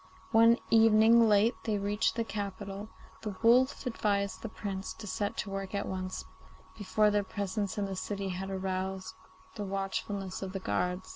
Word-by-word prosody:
One 230 Hz, +1 st, +6 dB
evening 225 Hz, +1 st, +6 dB
late 210 Hz, +3 st, +4 dB
they 215 Hz, -2 st, +1 dB
reached 205 Hz, +2 st, 0 dB
the 230 Hz, -, 0 dB
capital, 200 Hz, -2 st, -5 dB
and 210 Hz, +2 st, -8 dB, 0.3 s
the 210 Hz, -3 st, -4 dB
wolf 250 Hz, +4 st, +4 dB
advised 200 Hz, -4 st, -1 dB
the 225 Hz, -, -5 dB
Prince 195 Hz, -3 st, -5 dB
to 220 Hz, -, -10 dB
set 205 Hz, +1 st, -2 dB
to 195 Hz, -, -3 dB
work 195 Hz, 0 st, -4 dB
at 200 Hz, -, -2 dB
once, 185 Hz, 0 st, -4 dB, 0.5 s
before 210 Hz, 0 st, +2 dB
their 205 Hz, 0 st, +2 dB
presence 200 Hz, 0 st, -3 dB
in 205 Hz, -, 0 dB
the 195 Hz, -1 st, -4 dB
city 200 Hz, +1 st, -3 dB
had 190 Hz, +1 st, -4 dB
aroused 190 Hz, 0 st, -3 dB, 0.4 s
the 210 Hz, -, -5 dB
watchfulness 195 Hz, 0 st, -3 dB
of 190 Hz, -1 st, -5 dB
the 195 Hz, -, -2 dB
guards. 180 Hz, 0 st, -2 dB
200 Hz, 170 wpm, -31 LUFS, 190-215 Hz, 0.5 s, One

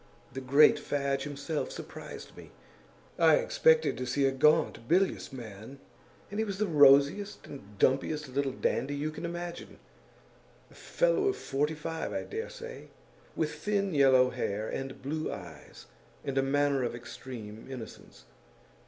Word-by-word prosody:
The 135 Hz, -, -5 dB
great 140 Hz, +4 st, +5 dB
Fadge 140 Hz, -1 st, -1 dB
himself 145 Hz, +2 st, -3 dB
surprised -, -, -9 dB
me; -, -, -12 dB, 0.7 s
I -, -, +6 dB
expected 485 Hz, -, +3 dB
to 125 Hz, -, -3 dB
see 135 Hz, +3 st, +1 dB
a 135 Hz, -, +3 dB
gaunt, 150 Hz, -3 st, +2 dB
bilious 185 Hz, 0 st, +1 dB
man, 115 Hz, 0 st, -9 dB, 0.5 s
and 205 Hz, -, -3 dB
he -, -, +2 dB
was 200 Hz, -3 st, -4 dB
the 215 Hz, -, +1 dB
rosiest 145 Hz, +4 st, +4 dB
and 105 Hz, -8 st, -12 dB
dumpiest 145 Hz, +6 st, +1 dB
little 135 Hz, +1 st, -1 dB
dandy 130 Hz, +2 st, -1 dB
you 150 Hz, +2 st, -2 dB
can 160 Hz, -, -7 dB
imagine; 175 Hz, 0 st, -6 dB, 0.9 s
a -, -, -16 dB
fellow -, -, +1 dB
of 395 Hz, -, 0 dB
forty 145 Hz, +3 st, -1 dB
five, 160 Hz, +1 st, -4 dB
I -, -, -2 dB
dare 445 Hz, +2 st, -5 dB
say, 475 Hz, -1 st, -9 dB, 0.5 s
with 150 Hz, -2 st, -1 dB
thin 200 Hz, +4 st, -1 dB
yellow 130 Hz, -3 st, +5 dB
hair 105 Hz, +2 st, -3 dB
and 135 Hz, 0 st, -5 dB
blue 155 Hz, +3 st, -3 dB
eyes -, -, -10 dB, 0.4 s
and 135 Hz, -, -3 dB
a 135 Hz, -, +3 dB
manner 140 Hz, 0 st, +1 dB
of 120 Hz, -1 st, -2 dB
extreme 120 Hz, -2 st, -9 dB
innocence. 125 Hz, -4 st, -10 dB
145 Hz, 150 wpm, -30 LUFS, 130-170 Hz, 0.9 s, I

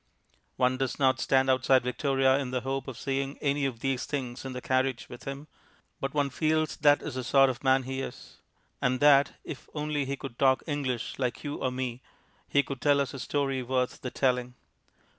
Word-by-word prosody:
One 130 Hz, 0 st, +2 dB
does 135 Hz, -1 st, -2 dB
not 130 Hz, -2 st, +3 dB
stand 135 Hz, 0 st, +3 dB
outside 130 Hz, 0 st, +4 dB
Victoria 135 Hz, +2 st, +2 dB
in 135 Hz, -3 st, -3 dB
the 125 Hz, 0 st, -1 dB
hope 135 Hz, +2 st, -3 dB
of 130 Hz, -3 st, -6 dB
seeing 135 Hz, +1 st, -2 dB
any 140 Hz, -1 st, 0 dB
of 115 Hz, -4 st, -7 dB
these 135 Hz, -2 st, -1 dB
things 130 Hz, -3 st, -4 dB
in 130 Hz, -1 st, -5 dB
the 125 Hz, -, -4 dB
carriage 130 Hz, 0 st, 0 dB
with 120 Hz, -, -10 dB
him, 140 Hz, +2 st, -6 dB, 0.5 s
but 135 Hz, -, -2 dB
one 145 Hz, -1 st, 0 dB
feels 155 Hz, +2 st, +1 dB
that 145 Hz, 0 st, +4 dB
is -, -, -5 dB
the 130 Hz, 0 st, -3 dB
sort 135 Hz, +1 st, +5 dB
of 125 Hz, -, -10 dB
man 130 Hz, 0 st, +4 dB
he 130 Hz, +1 st, -4 dB
is, -, -, -8 dB, 0.4 s
and 125 Hz, 0 st, +1 dB
that 145 Hz, -1 st, +5 dB
if 140 Hz, -, -8 dB
only 150 Hz, -1 st, -1 dB
he 140 Hz, +1 st, -3 dB
could 135 Hz, -4 st, -8 dB
talk 130 Hz, -1 st, +4 dB
English 135 Hz, -7 st, -3 dB
like 125 Hz, -2 st, -2 dB
you 145 Hz, -1 st, -4 dB
or 130 Hz, -, -1 dB
me, 125 Hz, -1 st, -4 dB, 0.5 s
he 140 Hz, -, +3 dB
could 135 Hz, -3 st, -6 dB
tell 145 Hz, -1 st, +4 dB
us 140 Hz, 0 st, -1 dB
a 135 Hz, -, -6 dB
story 135 Hz, 0 st, -1 dB
worth 125 Hz, 0 st, -1 dB
the 125 Hz, -, -3 dB
telling. 125 Hz, -1 st, 0 dB
135 Hz, 205 wpm, -28 LUFS, 130-140 Hz, 0.5 s, sort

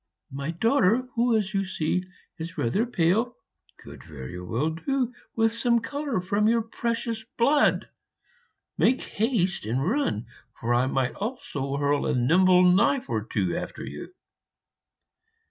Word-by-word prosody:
My 140 Hz, +2 st, -4 dB
daughter, 225 Hz, -, +2 dB
who, 235 Hz, -1 st, +3 dB
as 205 Hz, -2 st, -2 dB
you 195 Hz, -1 st, +1 dB
see, 180 Hz, -1 st, -1 dB, 0.4 s
is 165 Hz, +1 st, -6 dB
rather 200 Hz, -, +1 dB
pale, 220 Hz, +4 st, +1 dB, 0.4 s
could -, -, -12 dB
very 75 Hz, +4 st, -8 dB
well 120 Hz, -, -1 dB
do 250 Hz, -, -1 dB, 0.2 s
with 225 Hz, 0 st, +2 dB
some 235 Hz, 0 st, +2 dB
color 280 Hz, -1 st, -3 dB
from 200 Hz, +3 st, +1 dB
your 230 Hz, 0 st, +3 dB
precious 230 Hz, 0 st, -3 dB
blood. 285 Hz, +5 st, +3 dB, 0.9 s
Make 255 Hz, -, +3 dB
haste 210 Hz, -5 st, 0 dB
and 125 Hz, +7 st, -1 dB
run, 205 Hz, -, 0 dB, 0.3 s
for 120 Hz, +1 st, 0 dB
I 125 Hz, +2 st, +3 dB
might 130 Hz, -2 st, 0 dB
also 160 Hz, -, -4 dB
hurl 145 Hz, 0 st, +1 dB
a -, -, +1 dB
nimble 180 Hz, +8 st, +5 dB
knife 200 Hz, +9 st, +3 dB
or -, -, 0 dB
two -, -, -1 dB
after -, -, -5 dB
you.' -, -, -8 dB
195 Hz, 140 wpm, -26 LUFS, 145-235 Hz, 0.9 s, nimble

